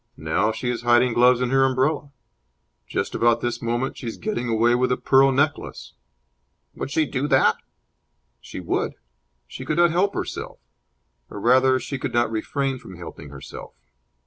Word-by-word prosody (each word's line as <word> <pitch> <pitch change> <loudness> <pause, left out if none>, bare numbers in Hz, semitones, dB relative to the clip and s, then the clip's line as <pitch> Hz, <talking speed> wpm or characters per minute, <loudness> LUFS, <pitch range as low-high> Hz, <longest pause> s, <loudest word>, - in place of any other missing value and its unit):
'Now 80 +8 0
she 110 +3 -5
is 120 -1 -4
hiding 120 0 +3
gloves 125 +1 +4
in 125 0 0
her 135 0 +4
umbrella!' 135 +3 0 0.8
'Just - - -3
about 120 0 +2
this 120 0 -3
moment 120 +3 -2
she 125 - -7
is 115 - -5
getting 165 - -3
away 115 +1 +3
with 125 +1 +1
a 125 - +1
pearl 135 0 +4
necklace!'" 145 +3 -2 0.8
"Would - - -5
she 155 +2 +1
do 140 0 -2
that?" 135 -3 +3 0.8
"She - - -9
would! - - -2 0.5
She 130 - -9
could 150 +4 -2
not 175 -1 +4
help 195 +4 +1
herself. - - -5 0.7
Or, - - -8
rather, 130 +3 +4
she 135 0 -5
could - - -4
not 120 -1 +2
refrain 135 +4 -2
from 95 - -12
helping 80 -4 -10
herself. 70 -1 -10
125 Hz, 170 wpm, -23 LUFS, 120-135 Hz, 0.8 s, gloves